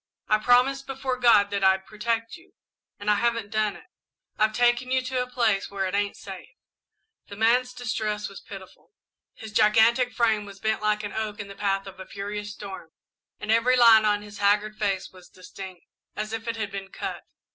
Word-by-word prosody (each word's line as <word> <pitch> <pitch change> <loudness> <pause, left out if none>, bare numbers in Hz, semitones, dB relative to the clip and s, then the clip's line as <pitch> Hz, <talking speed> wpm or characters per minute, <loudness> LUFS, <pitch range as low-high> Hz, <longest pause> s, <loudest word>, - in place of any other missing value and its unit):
I 215 - +3
promised 255 +4 +3
before 265 -1 -3
God 215 -5 +5
that 200 -1 -1
I'd 190 0 +3
protect 230 +4 -2
you, 355 +2 -18 0.5
and 205 - -9
I 210 - +5
haven't 230 -1 0
done 215 -2 0
it. - - -14 0.5
I've 215 0 +2
taken 240 +2 +2
you 260 0 +1
to 255 0 -1
a 250 - -4
place 230 -6 +1
where 195 -1 -2
it 185 - -3
ain't 205 0 -1
safe." 195 -2 -9 0.8
The 200 - -9
man's 240 +4 +2
distress 220 -4 -3
was 195 - -11
pitiful. 195 - -12 0.4
His 220 - -9
gigantic 225 +4 +4
frame 220 -4 +1
was 200 -1 -12
bent 220 +1 -1
like 210 0 +1
an 205 - -5
oak 215 -1 -4
in 200 -1 -6
the 195 - -9
path 195 -1 -1
of 195 -1 -11
a 190 - -9
furious 205 +1 -5
storm 195 -5 -9 0.5
and 210 - -2
every 230 +3 +4
line 230 -3 +8
on 205 -1 +1
his 205 -1 -11
haggard 205 +1 +2
face 200 -3 -2
was 185 -1 -16
distinct, 185 -1 -11 0.3
as 215 +1 -4
if 225 0 -5
it 230 - -1
had 215 -3 -3
been 195 -1 -6
cut. - - -5
215 Hz, 200 wpm, -26 LUFS, 200-235 Hz, 0.8 s, line